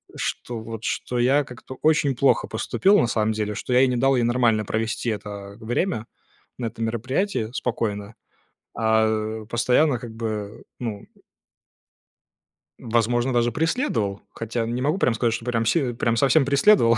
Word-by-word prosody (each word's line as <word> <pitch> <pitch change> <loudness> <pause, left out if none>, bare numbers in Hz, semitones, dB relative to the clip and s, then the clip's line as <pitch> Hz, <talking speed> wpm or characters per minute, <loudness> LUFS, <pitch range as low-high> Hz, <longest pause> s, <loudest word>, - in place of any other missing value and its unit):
Что 120 - -4
вот, 110 0 -7
что 125 - -2
я 135 +4 +4
как-то 130 +1 -11
очень 150 -4 +3
плохо 135 +2 +3
поступил, 200 +2 +2
на - - +2
самом 110 -1 +1
деле, 105 -1 -2
что 125 - -3
я 125 - +6
ей 130 - +5
не 125 - 0
дал 135 +2 +3
ей 120 - +2
нормально 115 -3 +2
провести 115 +2 -2
это 100 -1 -6
время 120 - -1 0.5
на 120 - -2
этом 115 0 -4
мероприятии 120 - -1
спокойно, 110 -4 -3 0.6
а 110 -1 +1
постоянно 125 +4 +3
как 120 -2 -8
бы, 110 -1 -5 0.2
ну 110 -5 -5 1.7
возможно, 120 +2 +1
даже 120 0 +2
преследовал. 155 - -1
Хотя 115 +1 -3
не 120 +2 -2
могу 150 +6 +1
прям 125 - +2
сказать, 115 0 +1
что 115 - -4
прям 115 -2 0
си 130 -2 +1
прям 115 0 0
совсем 140 +3 +4
преследовал, 140 - +5
120 Hz, 155 wpm, -24 LUFS, 110-130 Hz, 1.7 s, я